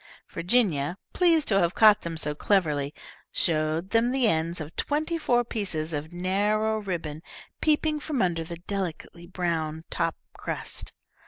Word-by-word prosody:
Virginia, 175 - +1 0.2
pleased 335 -4 +3
to 195 -2 +4
have 175 -1 +1
caught 215 -2 +7
them 165 -1 -5
so 150 -1 +2
cleverly, 150 -5 +1 0.4
showed 160 +2 0
them 230 +1 +3
the 260 -3 +2
ends 165 -1 +1
of 155 +1 -7
twenty 310 +3 -1
four 245 -7 +2
pieces 175 -9 -2
of 150 +2 -4
narrow 205 +5 +1
ribbon, 165 -7 -4 0.4
peeping 305 0 +2
from 295 -3 -3
under 170 -4 +1
the 170 +1 -7
delicately 175 -2 -5
brown 165 -3 -2
top 165 -1 0 0.2
crust. - - -5
180 Hz, 145 wpm, -27 LUFS, 160-220 Hz, 0.4 s, caught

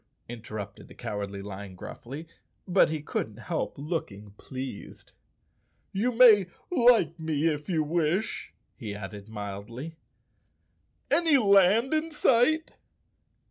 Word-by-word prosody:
interrupted 110 -4 -8
the - - -15
Cowardly 100 -1 -5
Lion 100 -1 -8
gruffly, 135 - -8 0.4
but 185 -2 +4
he 155 -2 -3
couldn't 110 -7 -3
help 160 +6 -3
looking 135 - -5
pleased. 130 +2 -8 0.8
"You 225 +6 0
may 225 -6 +7 0.2
like 235 - +4
me 160 -1 -1
if 150 0 -2
you 160 -4 +1
wish," 165 +5 -1 0.2
he 105 -2 -6
added 100 +1 -8
mildly. 110 +9 -7 1.1
"Any 325 -4 +5
land 205 - +4
in 310 +1 0
sight?" 300 +1 +2
155 Hz, 110 wpm, -28 LUFS, -, 1.1 s, may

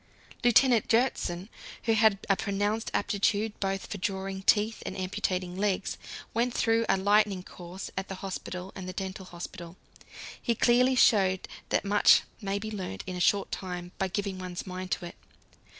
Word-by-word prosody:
Lieutenant 245 0 +5
Gjertsen, 215 -7 +1 0.4
who 225 - +2
had 220 -2 +5
a 195 - +4
pronounced 205 +3 -1
aptitude 210 +1 +1
both 195 0 -1
for 205 - -6
drawing 190 0 -3
teeth 215 +3 +2
and - - -5
amputating 185 -1 -2
legs, 195 0 0 0.4
went 240 +2 0
through 225 0 +2
a - - +4
"lightning 200 -1 +3
course" 180 +1 -9
at 190 0 -3
the 190 - -5
hospital 185 -1 -5
and 185 -1 -6
the - - -5
dental 190 0 -5
hospital. 175 0 -8 0.6
He 235 - +1
clearly 250 +3 +4
showed 190 -6 +4 0.2
that - - +1
much 205 +1 +6 0.2
may 200 -1 -1
be 215 +2 -5
learnt 185 - -5
in 185 - -5
a - - -4
short 200 +2 +2
time 180 -2 -5
by 190 - +1
giving 195 0 -3
one's 180 -1 -5
mind 185 0 -6
to 175 - -4
it. 175 - -8
195 Hz, 165 wpm, -29 LUFS, 185-215 Hz, 0.6 s, much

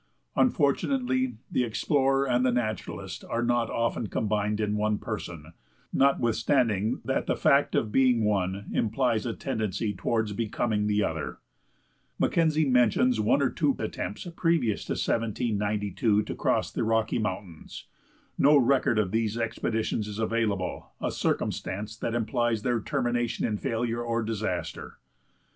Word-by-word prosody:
Unfortunately, 135 - +1 0.2
the 125 - +2
explorer 135 +3 +1
and 125 0 +2
the 130 - +3
naturalist 115 -3 -3
are 120 - -2
not 120 -1 +1
often 115 -1 -1
combined 105 0 -1
in 105 -1 0
one 105 0 +1
person, 85 -8 -6 0.4
notwithstanding 115 -4 +2
that - - -1
the - - +1
fact - - +3
of 110 - 0
being 125 -2 +3
one, 100 -1 0
implies 115 0 +1
a 115 - -2
tendency 105 0 -2
toward 105 +2 -1
becoming 110 -1 -1
the 105 0 +2
other. - - -3 0.8
Mackenzie 155 -2 +2
mentions 125 -1 +3
one 110 +6 +3
or 130 - +1
two 145 -4 +1
attempts 105 - -4
previous 165 - +1
to - - -2
1792 105 -2 0
to - - -5
cross - - 0
the - - -2
Rocky 110 +1 +1
Mountains. 95 -6 -5 0.5
No 145 +2 +6
record 130 -3 +3
of 100 -4 +1
these 110 0 0
expeditions 115 -1 -1
is 105 -1 -6
available, 110 -4 -1
a - - -1
circumstance 105 +3 -2
that 115 0 -2
implies 120 -1 0
their 120 -2 +1
termination 120 -2 -1
in 105 -2 -1
failure 115 +1 -1
or 115 -1 -1
disaster. 110 -1 -4
115 Hz, 135 wpm, -27 LUFS, 105-125 Hz, 0.8 s, No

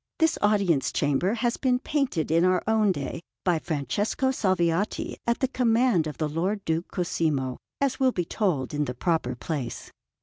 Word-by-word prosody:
This 320 0 +2
Audience 200 -9 +2
Chamber 145 - +1
has 235 +1 0
been 250 -2 +2
painted 255 - -1
in 165 +1 +4
our 185 0 +3
own 220 -2 +3
day 145 -1 -4 0.2
by 175 -3 +2
Francesco 200 - -1
Salviati 185 -4 0
at 235 +3 +1
the 265 - +3
command 235 - +2
of 150 - -6
the 155 - 0
Lord 185 +7 -2
Duke 165 +2 -1
Cosimo, 150 -7 -1 0.2
as 275 -2 0
will 260 -1 +4
be 180 -7 -2
told 165 - -1
in 150 0 0
the 125 - -4
proper 160 -5 0
place. 130 -2 -5
180 Hz, 170 wpm, -26 LUFS, 155-225 Hz, 0.2 s, in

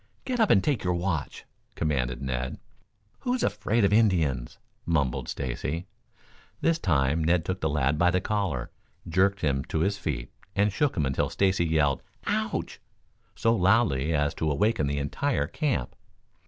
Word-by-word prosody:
"Get 255 -2 -2
up 220 - +4
and 95 - +5
take 140 -7 0
your 90 -1 +1
watch!" 85 -3 -3 0.3
commanded 65 -5 -1
Ned. 65 -1 -3 0.6
"Who's 250 0 -1
afraid 105 +2 +1
of 100 - +2
Indians?" 85 - +2 0.3
mumbled 75 -7 0
Stacy. 70 +6 -3 0.7
This 165 0 +2
time 80 - +1
Ned 85 +1 +2
took 95 +2 -3
the 80 - +1
lad 75 0 +1
by 90 +1 +5
the 90 +1 +2
collar, 105 -1 -2 0.4
jerked 95 +3 +2
him 70 -2 +1
to 80 - -2
his 100 +3 0
feet - - -3 0.2
and 100 0 +2
shook 145 0 0
him 75 - +2
until 65 0 0
Stacy 95 -3 +1
yelled 75 -4 +2 0.2
"Ouch!" - - -2 0.5
so 115 0 +2
loudly 90 - +3
as 75 -1 +1
to 80 - -1
awaken 75 +2 +1
the 70 0 -1
entire 75 - 0
camp. 150 -5 -2
85 Hz, 155 wpm, -27 LUFS, 70-100 Hz, 0.7 s, and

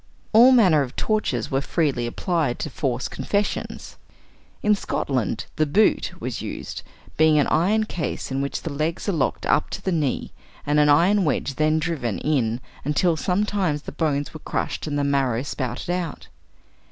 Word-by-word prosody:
All 240 +4 +8
manner 185 - +5
of 125 -3 -4
tortures 210 - -1
were 135 0 +1
freely 140 -6 0
applied 155 0 -1
to 155 - -4
force 130 -3 -2
confessions. 205 0 -3 0.7
In 210 - +4
Scotland 130 - -1
"the 155 - +2
boot" 210 +9 +2
was - - -4
used, - - -6 0.4
being 155 -1 +5
an 145 - +4
iron 200 +7 +2
case 175 -9 -4
in 135 +1 -1
which 140 - -3
the 160 - -4
legs 155 +7 -2
are - - +2
locked 155 -7 -1
up 150 - +2
to - - -5
the 190 - 0
knees, 150 -6 -1 0.3
and 150 +1 +2
an 150 0 +5
iron 180 +7 +4
wedge 145 -3 0
then 155 +3 +2
driven 150 - -2
in 125 -6 0 0.2
until 160 +4 +2
sometimes 180 -3 0
the - - -7
bones 145 -3 -1
were 155 - -8
crushed - - -3
and 145 -1 -2
the 145 - +1
marrow 135 -4 +1
spouted 130 +2 -4
out. 175 -4 -4
155 Hz, 170 wpm, -23 LUFS, 140-180 Hz, 0.7 s, All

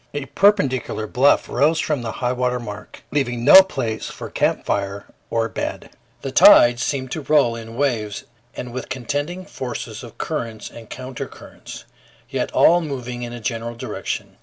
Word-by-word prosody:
A 145 -1 -3
perpendicular 135 - +1
bluff 130 +6 +3
rose 155 +3 +2
from 150 -5 -1
the 115 -2 -4
highwater 125 0 -1
mark, 105 -3 -9
leaving 120 -5 -1
no 190 +7 +11
place 130 -12 -4
for - - -8
camp - - 0
fire 100 0 -2 0.2
or 115 0 0
bed. - - -5 0.3
The - - -3
tide 120 0 +7
seemed 130 0 -2
to 160 - -3
roll 140 -5 +3
in 115 0 -9
waves 115 -7 -1 0.3
and 125 -1 -6
with 130 - -6
contending 145 +9 -3
forces 115 -3 -6
of 120 - -12
currents 115 -8 -4
and 115 -1 -12
counter 130 0 -6
currents, - - -12 0.5
yet - - -2
all 175 +1 +5
moving 125 -5 -5
in 120 -1 -5
a 120 - -7
general 115 +1 -4
direction. - - -5
125 Hz, 160 wpm, -21 LUFS, 115-140 Hz, 0.5 s, no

